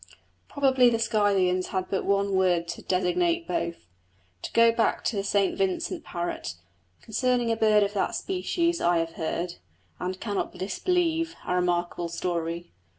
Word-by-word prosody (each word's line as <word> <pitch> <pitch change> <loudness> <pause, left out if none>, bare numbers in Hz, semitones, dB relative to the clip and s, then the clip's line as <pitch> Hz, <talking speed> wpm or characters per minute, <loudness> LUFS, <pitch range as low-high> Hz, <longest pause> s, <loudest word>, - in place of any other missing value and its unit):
Probably 265 -3 +4
the 230 - +1
Scythians 200 -5 +2
had 185 -1 -2
but 195 - -1
one 200 0 +1
word 180 -3 +2
to - - -5
designate 335 - +1
both. 170 - -3 0.6
To - - -6
go 230 0 +6
back 230 0 +1
to 230 - 0
the 200 - -1
St 200 -1 +1
Vincent 190 -2 -1
parrot. 170 - -4 0.5
Concerning 245 +1 +1
a - - +2
bird 215 -2 +4
of 200 0 -2
that 200 - 0
species 345 -2 -1
I 175 0 +3
have 165 0 -1
heard, 170 +2 -3 0.4
and 185 +1 -3
cannot 205 -3 -3
disbelieve, 330 - 0
a - - -1
remarkable 175 -1 0
story. 170 0 -3
200 Hz, 155 wpm, -27 LUFS, 180-240 Hz, 0.6 s, go